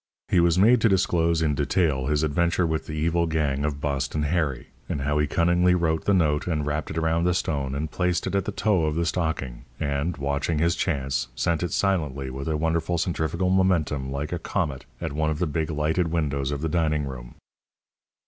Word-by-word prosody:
He 90 Hz, -, +4 dB
was 85 Hz, 0 st, +3 dB
made 110 Hz, +5 st, +5 dB
to 115 Hz, -, +4 dB
disclose 85 Hz, -4 st, +2 dB
in 75 Hz, -2 st, +2 dB
detail 70 Hz, -1 st, +1 dB
his 75 Hz, +1 st, +1 dB
adventure 85 Hz, +3 st, +1 dB
with 80 Hz, -1 st, -2 dB
the 75 Hz, -, -5 dB
evil 85 Hz, +2 st, +1 dB
gang 75 Hz, -3 st, 0 dB
of 75 Hz, -1 st, -2 dB
Boston 70 Hz, +1 st, -1 dB
Harry, 75 Hz, -4 st, -1 dB, 0.2 s
and 70 Hz, -, -2 dB
how 75 Hz, +2 st, 0 dB
he 75 Hz, -, +2 dB
cunningly 90 Hz, +3 st, +3 dB
wrote 80 Hz, -2 st, 0 dB
the 100 Hz, -, +3 dB
note 75 Hz, -4 st, +1 dB
and 75 Hz, -4 st, -1 dB
wrapped 75 Hz, +1 st, -2 dB
it 75 Hz, -, -5 dB
around 80 Hz, +1 st, +1 dB
the 90 Hz, -1 st, +2 dB
stone 70 Hz, -6 st, -1 dB
and 75 Hz, +1 st, -3 dB
placed 90 Hz, -1 st, 0 dB
it -, -, -3 dB
at 100 Hz, -1 st, +1 dB
the -, -, -2 dB
toe 100 Hz, -7 st, +1 dB
of 75 Hz, -1 st, -1 dB
the 85 Hz, +1 st, 0 dB
stocking, 80 Hz, -8 st, -2 dB
and, 70 Hz, +3 st, -1 dB
watching 70 Hz, +3 st, -1 dB
his 85 Hz, +3 st, +2 dB
chance, 70 Hz, -7 st, -1 dB
sent 85 Hz, +3 st, 0 dB
it 90 Hz, -3 st, -2 dB
silently, 75 Hz, -10 st, 0 dB
with 70 Hz, +3 st, -6 dB
a 80 Hz, -1 st, 0 dB
wonderful 80 Hz, +2 st, 0 dB
centrifugal 85 Hz, +2 st, -1 dB
momentum, 80 Hz, -8 st, +1 dB
like 70 Hz, +4 st, -3 dB
a 85 Hz, -, -2 dB
comet, 75 Hz, -7 st, -3 dB
at -, -, -4 dB
one 80 Hz, +1 st, 0 dB
of 75 Hz, -, -1 dB
the 90 Hz, -, 0 dB
big 80 Hz, 0 st, -2 dB
lighted 80 Hz, +3 st, 0 dB
windows 70 Hz, -5 st, -1 dB
of 70 Hz, -1 st, -3 dB
the 80 Hz, -, 0 dB
dining 75 Hz, -3 st, +1 dB
room. -, -, -8 dB
80 Hz, 210 wpm, -25 LUFS, 70-85 Hz, 0.2 s, made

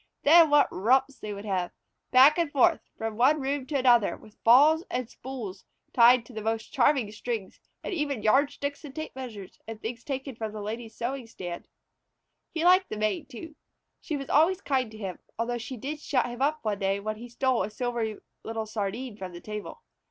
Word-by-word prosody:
Then 325 Hz, +2 st, +7 dB
what 290 Hz, 0 st, +5 dB
romps 260 Hz, +7 st, +2 dB
they 215 Hz, -, -6 dB
would 200 Hz, +1 st, -7 dB
have! 185 Hz, -3 st, -1 dB, 0.4 s
Back 275 Hz, +6 st, +7 dB
and 330 Hz, -4 st, 0 dB
forth 330 Hz, +4 st, +3 dB, 0.2 s
from 225 Hz, -1 st, -4 dB
one 275 Hz, +6 st, +4 dB
room 270 Hz, -1 st, -2 dB
to 290 Hz, -, -1 dB
another, 245 Hz, -5 st, +4 dB
with 215 Hz, -1 st, -19 dB
balls, 295 Hz, +8 st, +6 dB, 0.2 s
spools 225 Hz, -6 st, -8 dB, 0.3 s
tied 240 Hz, +1 st, +7 dB
onto 240 Hz, +2 st, -16 dB
the 215 Hz, -, -5 dB
most 220 Hz, 0 st, -3 dB
charming 255 Hz, -4 st, +3 dB
strings, 220 Hz, -2 st, -5 dB, 0.2 s
and -, -, -4 dB
even 285 Hz, -, -2 dB
yardsticks 285 Hz, +5 st, +1 dB
and 285 Hz, -2 st, -10 dB
tape 315 Hz, -3 st, -6 dB
measures, 225 Hz, -8 st, -8 dB
and 225 Hz, -1 st, -7 dB
things 230 Hz, +3 st, -6 dB
taken 270 Hz, -2 st, -5 dB
from 220 Hz, -2 st, -5 dB
the 215 Hz, -, -6 dB
Lady's 225 Hz, +2 st, -6 dB
sewing 250 Hz, 0 st, -4 dB
stand. 175 Hz, -6 st, -7 dB, 0.8 s
He 325 Hz, -, -2 dB
liked 370 Hz, +1 st, +5 dB
the 215 Hz, -, -4 dB
Maid, 215 Hz, -2 st, -1 dB
too. 310 Hz, +6 st, -9 dB, 0.4 s
She 305 Hz, -, -4 dB
was 275 Hz, -1 st, -6 dB
always 330 Hz, +6 st, +4 dB
kind 265 Hz, -, 0 dB
to 215 Hz, -, -12 dB
him, 195 Hz, -4 st, -6 dB, 0.2 s
although 240 Hz, +1 st, -2 dB
she 250 Hz, +3 st, -7 dB
did 290 Hz, +6 st, -5 dB
shut 275 Hz, -3 st, 0 dB
him 245 Hz, +1 st, -6 dB
up 300 Hz, -1 st, 0 dB
one 205 Hz, -2 st, -1 dB
day 195 Hz, 0 st, 0 dB
when 215 Hz, +1 st, -4 dB
he 240 Hz, +2 st, -10 dB
stole 255 Hz, +1 st, +1 dB
a 195 Hz, -, -2 dB
silvery 230 Hz, -1 st, -3 dB, 0.3 s
little 225 Hz, -1 st, -4 dB
sardine 215 Hz, +2 st, -4 dB
from 185 Hz, -3 st, -7 dB
the 175 Hz, -, -8 dB
table. 210 Hz, -, -7 dB
240 Hz, 195 wpm, -27 LUFS, 215-280 Hz, 0.8 s, Then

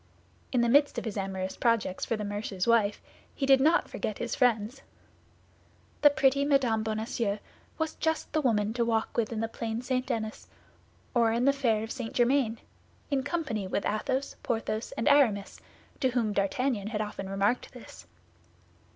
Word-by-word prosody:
In 250 Hz, -, +2 dB
the 235 Hz, -, +3 dB
midst 285 Hz, +4 st, +4 dB
of -, -, -3 dB
his 220 Hz, -, -4 dB
amorous 190 Hz, -1 st, -3 dB
projects 230 Hz, -6 st, 0 dB
for 230 Hz, -, -1 dB
the 210 Hz, -, -4 dB
mercer's 205 Hz, -2 st, -3 dB
wife, 220 Hz, -3 st, +3 dB, 0.4 s
he 275 Hz, -, -1 dB
did 270 Hz, -1 st, +5 dB
not 320 Hz, +5 st, +4 dB
forget -, -, -4 dB
his -, -, -3 dB
friends. 240 Hz, 0 st, +1 dB, 1.2 s
The 290 Hz, -, +8 dB
pretty 280 Hz, -1 st, +2 dB
Mme. 265 Hz, -6 st, +2 dB
Bonacieux 220 Hz, -1 st, -2 dB, 0.4 s
was 320 Hz, -1 st, -1 dB
just 320 Hz, 0 st, -1 dB
the 310 Hz, -, +2 dB
woman 220 Hz, -5 st, +1 dB
to 235 Hz, 0 st, +1 dB
walk 225 Hz, -1 st, 0 dB
with 230 Hz, -1 st, 0 dB
in 225 Hz, -1 st, -2 dB
the 225 Hz, -, 0 dB
Plain 225 Hz, +1 st, -4 dB
St. 255 Hz, 0 st, -1 dB
Denis 220 Hz, -1 st, -4 dB, 0.7 s
or 235 Hz, -2 st, +3 dB
in 235 Hz, +2 st, +1 dB
the 275 Hz, -, +5 dB
fair 230 Hz, -6 st, +1 dB
of 225 Hz, -, -6 dB
St. 240 Hz, -4 st, -5 dB
Germain, 240 Hz, -2 st, +2 dB, 0.5 s
in 275 Hz, -1 st, +2 dB
company 275 Hz, -, -2 dB
with 195 Hz, -, -2 dB
Athos, 260 Hz, +6 st, -1 dB
Porthos, 225 Hz, -1 st, -2 dB
and 230 Hz, -, -2 dB
Aramis, 245 Hz, -9 st, +3 dB, 0.4 s
to 260 Hz, -, +2 dB
whom 235 Hz, -4 st, 0 dB
D'Artagnan 205 Hz, +2 st, 0 dB
had 215 Hz, -1 st, -2 dB
often 210 Hz, -2 st, -5 dB
remarked 195 Hz, +5 st, 0 dB
this. -, -, -12 dB
230 Hz, 170 wpm, -29 LUFS, 215-265 Hz, 1.2 s, The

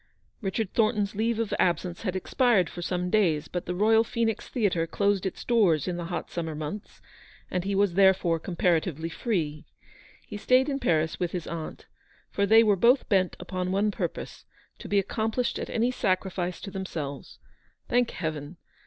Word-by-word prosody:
Richard 195 Hz, 0 st, -2 dB
Thornton's 215 Hz, -3 st, +1 dB
leave 225 Hz, +2 st, 0 dB
of 225 Hz, -2 st, -2 dB
absence 175 Hz, 0 st, 0 dB
had 185 Hz, -4 st, -2 dB
ex 185 Hz, -, -6 dB
pired 240 Hz, -9 st, +3 dB
for 175 Hz, -, -7 dB
some 180 Hz, 0 st, -2 dB
days, 165 Hz, -8 st, +2 dB
but 180 Hz, -, -5 dB
the 180 Hz, -, -2 dB
Royal 220 Hz, +3 st, +4 dB
Phoenix 230 Hz, -2 st, -2 dB
Theatre 185 Hz, -8 st, 0 dB
closed 200 Hz, +2 st, +1 dB
its -, -, -7 dB
doors 190 Hz, -, +3 dB
in 180 Hz, -, -1 dB
the 175 Hz, -1 st, -4 dB
hot 170 Hz, -1 st, -5 dB
summer 165 Hz, -2 st, -3 dB
months, 155 Hz, +7 st, -7 dB, 0.5 s
and 180 Hz, -, -1 dB
he 200 Hz, +1 st, -1 dB
was 200 Hz, -2 st, +2 dB
therefore 190 Hz, -3 st, +4 dB
comparatively 165 Hz, -2 st, 0 dB
free. 160 Hz, -7 st, -2 dB, 0.6 s
He 210 Hz, -, -7 dB
stayed 255 Hz, +6 st, +3 dB
in 275 Hz, -1 st, -1 dB
Paris 160 Hz, -, +1 dB
with 175 Hz, -2 st, -2 dB
his 175 Hz, -3 st, -3 dB
aunt, 165 Hz, -2 st, -6 dB, 0.5 s
for 200 Hz, 0 st, +1 dB
they 225 Hz, +2 st, +7 dB
were 210 Hz, -2 st, +4 dB
both 235 Hz, +8 st, +3 dB
bent 190 Hz, -4 st, +2 dB
upon 185 Hz, -1 st, -3 dB
one 205 Hz, +2 st, +2 dB
purpose, -, -, -5 dB, 0.3 s
to -, -, -8 dB
be 205 Hz, -, +2 dB
accomplished 220 Hz, +5 st, -1 dB
at -, -, -5 dB
any 235 Hz, +2 st, +1 dB
sacrifice 185 Hz, -4 st, -1 dB
to 195 Hz, -, -7 dB
themselves. 160 Hz, -8 st, -6 dB, 0.5 s
Thank 245 Hz, -1 st, +2 dB
Heaven 155 Hz, -1 st, -5 dB
190 Hz, 175 wpm, -27 LUFS, 170-215 Hz, 0.6 s, they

